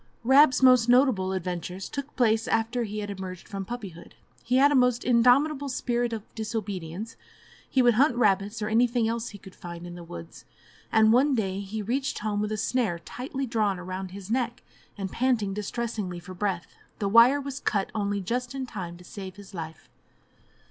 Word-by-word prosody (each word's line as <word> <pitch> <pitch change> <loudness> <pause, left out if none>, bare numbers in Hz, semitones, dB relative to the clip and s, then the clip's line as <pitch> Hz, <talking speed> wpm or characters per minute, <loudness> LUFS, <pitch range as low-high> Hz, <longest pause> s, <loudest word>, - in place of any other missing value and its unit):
Rab's 265 +2 +6
most 255 -2 +6
notable 245 -7 +4
adventures 180 0 -4
took 280 +1 -6
place 225 -3 +2
after 225 +2 0
he 210 0 -4
had 205 0 -4
emerged 185 -2 -7
from 195 -1 -5
puppyhood. 200 -7 -8 0.3
He 245 - 0
had 285 +2 +6
a - - +3
most 250 -2 +3
indomitable 265 +4 +3
spirit 240 -1 -1
of 220 -2 -4
disobedience; 210 -3 -5 0.5
he 260 - +3
would 240 -1 +5
hunt 260 +3 +3
rabbits 205 -1 +1
or - - -1
anything 235 +1 +2
else 230 +1 -2
he 205 - -10
could 190 -1 -14
find 170 -1 -9
in 175 - -8
the 175 0 -9
woods, 85 - -10 0.5
and 220 0 +5
one 270 +3 +4
day 195 -4 -1
he 205 +2 -5
reached 265 +6 -1
home 210 -1 -1
with 210 0 -2
a 215 - -1
snare 220 -5 0
tightly 265 +9 -5
drawn 215 -5 0
round 185 +1 -5
his 195 +2 -9
neck, 240 -1 -1 0.3
and 195 -1 -4
panting 235 -6 +1
distressingly 210 -3 -3
for 180 +2 -10
breath; 185 -2 -3 0.2
the 200 - -1
wire 230 +7 +6
was 280 -1 -5
cut 200 -7 -1
only 205 -2 -1
just 245 +6 -3
in 265 -1 -3
time 180 -8 -7
to 180 - -15
save 190 0 -8
his 200 0 -13
life. 160 -3 -7
220 Hz, 185 wpm, -27 LUFS, 190-245 Hz, 0.5 s, Rab's